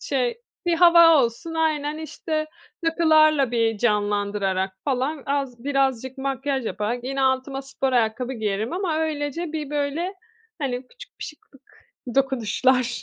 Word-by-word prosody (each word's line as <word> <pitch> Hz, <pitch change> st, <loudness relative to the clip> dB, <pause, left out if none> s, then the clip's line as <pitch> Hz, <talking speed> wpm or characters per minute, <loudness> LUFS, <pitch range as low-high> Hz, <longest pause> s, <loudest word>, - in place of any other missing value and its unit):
şey 255 Hz, -, -1 dB, 0.3 s
Bir 340 Hz, -, +3 dB
hava 340 Hz, -1 st, +7 dB
olsun, 235 Hz, +8 st, -5 dB
aynen. 305 Hz, -2 st, 0 dB
İşte, 310 Hz, 0 st, -3 dB, 0.4 s
takılarla 310 Hz, -4 st, +4 dB
bir 225 Hz, -3 st, +1 dB
canlandırarak 205 Hz, -3 st, 0 dB
falan 275 Hz, +2 st, -1 dB
az 275 Hz, -4 st, -2 dB
birazcık 265 Hz, -2 st, 0 dB
makyaj 270 Hz, -2 st, -2 dB
yaparak 235 Hz, +4 st, -3 dB
yine 270 Hz, +1 st, -2 dB
altıma 265 Hz, +1 st, 0 dB
spor 270 Hz, -1 st, -2 dB
ayakkabı 240 Hz, +2 st, +1 dB
giyerim 215 Hz, 0 st, -2 dB
ama 355 Hz, -3 st, -1 dB
öylece 315 Hz, +1 st, -2 dB
bir, 300 Hz, -2 st, -4 dB
böyle, 295 Hz, +6 st, -2 dB, 0.4 s
hani, 255 Hz, -3 st, -3 dB
küçük -, -, -15 dB
bir -, -, -3 dB
şıklık 285 Hz, -3 st, -13 dB, 0.5 s
dokunuşlar. 255 Hz, -1 st, +1 dB
270 Hz, 130 wpm, -24 LUFS, 240-310 Hz, 0.5 s, hava